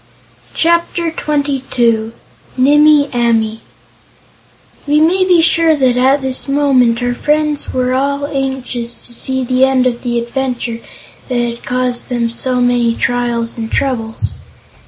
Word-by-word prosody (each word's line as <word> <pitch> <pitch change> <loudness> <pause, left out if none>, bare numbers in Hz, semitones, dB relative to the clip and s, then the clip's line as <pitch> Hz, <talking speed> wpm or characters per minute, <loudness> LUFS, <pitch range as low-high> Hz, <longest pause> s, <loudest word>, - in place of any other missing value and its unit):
Chapter 340 0 +1
Twenty 290 -3 -1
Two 230 -2 +1 0.4
Nimmie 295 +2 +5
Amee 225 -2 0 1.3
We 295 +1 +3
may 350 +5 +3
be 355 -3 +4
sure 330 -1 +4
that 260 -4 +2
at 265 +2 +2
this 260 +1 -2
moment 260 -4 +2
our 245 0 0
friends 300 +2 -1
were 255 0 -1
all 280 +2 -1
anxious 265 -4 -3
to 240 - -5
see 260 +2 0
the 255 +1 +1
end 265 -1 +3
of 245 -1 -1
the 240 -1 -2
adventure 240 -1 -3 0.5
that 250 - -2
had 235 -1 -2
caused 250 -1 -2
them 235 -2 -1
so 250 +1 -2
many 245 -1 +1
trials 235 -1 -2
and 225 0 -5
troubles. 230 -5 -2
255 Hz, 135 wpm, -14 LUFS, 240-285 Hz, 1.3 s, Nimmie